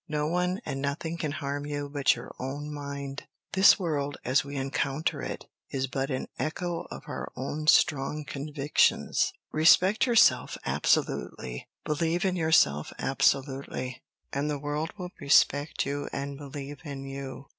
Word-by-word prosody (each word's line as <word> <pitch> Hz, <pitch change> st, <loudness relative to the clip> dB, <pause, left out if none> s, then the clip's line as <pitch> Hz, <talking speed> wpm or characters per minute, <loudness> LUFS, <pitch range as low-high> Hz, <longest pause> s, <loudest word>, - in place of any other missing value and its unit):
No 150 Hz, -1 st, -1 dB
one 180 Hz, +5 st, 0 dB
and 135 Hz, -, -3 dB
nothing 145 Hz, +4 st, -2 dB
can 155 Hz, -3 st, -1 dB
harm 145 Hz, -1 st, -3 dB
you 145 Hz, -1 st, -3 dB
but 140 Hz, -1 st, +2 dB
your -, -, -9 dB
own 145 Hz, +3 st, -4 dB
mind. 140 Hz, -1 st, -6 dB, 0.3 s
The 190 Hz, +1 st, +8 dB
world, 145 Hz, -7 st, -2 dB
as 130 Hz, +2 st, +3 dB
we 140 Hz, 0 st, -7 dB
encounter 135 Hz, +2 st, -1 dB
it, -, -, -5 dB, 0.2 s
is 135 Hz, -1 st, -1 dB
but 135 Hz, +1 st, -2 dB
an 130 Hz, -2 st, -2 dB
echo 170 Hz, +2 st, -2 dB
of -, -, -8 dB
our -, -, -5 dB
own 150 Hz, +4 st, -4 dB
strong 150 Hz, -1 st, +3 dB
convictions. 145 Hz, +1 st, +1 dB, 0.2 s
Respect 185 Hz, +8 st, +5 dB
yourself 230 Hz, -2 st, +4 dB
absolutely, 60 Hz, -1 st, 0 dB, 0.2 s
believe 165 Hz, +4 st, 0 dB
in 185 Hz, -1 st, +1 dB
yourself 160 Hz, -, +3 dB
absolutely, 135 Hz, -2 st, 0 dB, 0.3 s
and 140 Hz, +2 st, 0 dB
the 150 Hz, -, -1 dB
world 150 Hz, +3 st, -3 dB
will 180 Hz, -2 st, -6 dB
respect 145 Hz, +1 st, +3 dB
you 145 Hz, +1 st, -3 dB
and 140 Hz, 0 st, -4 dB
believe 140 Hz, 0 st, -7 dB
in 140 Hz, -3 st, -6 dB
you. 135 Hz, 0 st, -7 dB
145 Hz, 145 wpm, -28 LUFS, 135-155 Hz, 0.3 s, The